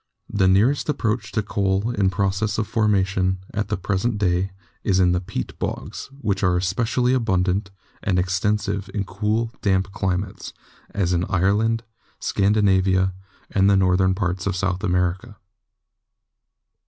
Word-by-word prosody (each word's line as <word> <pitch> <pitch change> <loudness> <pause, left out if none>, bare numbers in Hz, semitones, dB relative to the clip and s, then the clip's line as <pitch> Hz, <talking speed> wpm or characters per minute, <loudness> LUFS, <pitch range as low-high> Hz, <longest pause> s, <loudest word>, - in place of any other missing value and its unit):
The 95 -2 +3
nearest 110 +12 +3
approach 110 -6 -1
to 110 - 0
coal 100 +1 0
in 100 -5 +2
process 100 +2 0
of 110 - 0
formation 95 -4 +1 0.2
at 105 0 -1
the 105 - -1
present 105 +4 -1
day 95 -1 +1 0.3
is 95 -2 +2
in 90 -1 +4
the 90 0 +1
peat 75 -8 -5
nogs, - - -4
which 100 -6 0
are 90 -2 +3
especially 115 +7 +1
abundant 100 -4 +1 0.3
and 95 -2 0
extensive 100 +2 0
in 100 - 0
cool, 105 +4 -1
damp 95 -1 +1
climates, 95 0 -3 0.4
as 90 -3 0
in 85 0 +1
Ireland, 105 +6 +1 0.4
Scandinavia, 95 -2 +2 0.4
and 100 0 +3
the 100 - +5
north 90 0 +3
ern 95 0 +3
parts 90 -2 -2
of 100 - 0
South 95 +1 -1
America. 90 +3 -1
95 Hz, 140 wpm, -23 LUFS, 95-105 Hz, 0.4 s, the